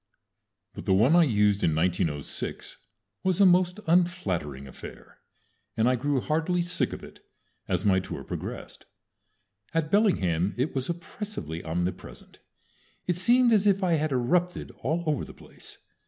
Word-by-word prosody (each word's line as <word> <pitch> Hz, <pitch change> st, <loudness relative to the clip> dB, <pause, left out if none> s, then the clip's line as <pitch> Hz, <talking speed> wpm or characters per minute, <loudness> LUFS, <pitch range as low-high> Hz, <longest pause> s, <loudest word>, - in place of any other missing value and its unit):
But -, -, -9 dB
the 95 Hz, -, +3 dB
one 120 Hz, -, +4 dB
I 175 Hz, -1 st, +6 dB
used 105 Hz, -5 st, +2 dB
in 80 Hz, -, +2 dB
1906 80 Hz, -4 st, -2 dB, 0.5 s
was 185 Hz, -1 st, +1 dB
a 200 Hz, -, +7 dB
most 180 Hz, +1 st, +3 dB
unflattering 95 Hz, -, 0 dB
affair, 65 Hz, -, -12 dB, 0.6 s
and 110 Hz, +1 st, +3 dB
I 130 Hz, -, +3 dB
grew 140 Hz, +2 st, 0 dB
heartily 165 Hz, +6 st, 0 dB
sick 175 Hz, +1 st, -1 dB
of -, -, -8 dB
it -, -, -13 dB, 0.4 s
as 105 Hz, -, -1 dB
my 95 Hz, -2 st, +4 dB
tour 95 Hz, -, -6 dB
progressed. -, -, -7 dB, 0.9 s
At 160 Hz, -1 st, 0 dB
Bellingham 100 Hz, -, +2 dB
it 130 Hz, +5 st, -1 dB
was 130 Hz, +2 st, -3 dB
oppressively 170 Hz, -, -5 dB
omnipresent. 90 Hz, +3 st, -5 dB, 0.7 s
It 180 Hz, -, 0 dB
seemed 240 Hz, +6 st, +4 dB
as 210 Hz, -1 st, +4 dB
if 195 Hz, -1 st, +3 dB
I 180 Hz, -2 st, +2 dB
had 155 Hz, -1 st, 0 dB
erupted 170 Hz, +8 st, 0 dB
all 170 Hz, +2 st, -1 dB
over 150 Hz, -4 st, 0 dB
the -, -, -11 dB
place. -, -, -15 dB
150 Hz, 150 wpm, -27 LUFS, -, 0.9 s, a